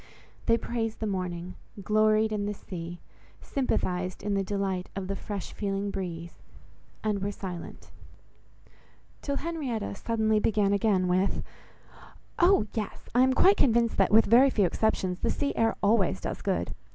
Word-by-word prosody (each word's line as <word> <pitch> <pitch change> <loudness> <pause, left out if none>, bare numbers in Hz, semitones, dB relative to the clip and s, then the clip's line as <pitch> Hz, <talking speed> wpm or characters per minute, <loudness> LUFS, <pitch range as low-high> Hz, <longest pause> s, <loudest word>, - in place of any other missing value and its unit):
They 230 - +5
praised 225 -2 -3
the 220 - -2
morning; 180 -3 -3 0.3
gloried 215 +2 +3
in 205 -1 -1
the 210 - -3
sea; 175 -2 -8 0.4
sympathized 185 -9 -2
in 205 - -1
the 195 0 +1
delight 195 -2 -2
of 195 -1 -4
the 195 - -2
fresh 200 -1 -6
feeling 200 -1 -2
breeze—and 185 +3 -6
were 200 +1 -1
silent; 185 -4 -8 1.3
till 280 - -2
Henrietta 280 -11 -3
suddenly 220 0 +1
began 205 -2 +2
again 200 -3 +2
with— 185 +2 +1 1.0
"Oh! 360 - +5
yes,—I 225 +3 -2
am 260 0 +4
quite 390 +9 +5
convinced 235 -3 +3
that, 195 - +4
with 220 +1 +6
very 245 +6 +6
few 210 -6 +2
exceptions, 185 -1 0
the - - 0
sea 285 - -1
air 225 0 +2
always 200 - +3
does - - -5
good. - - -1
205 Hz, 145 wpm, -28 LUFS, 185-225 Hz, 1.3 s, with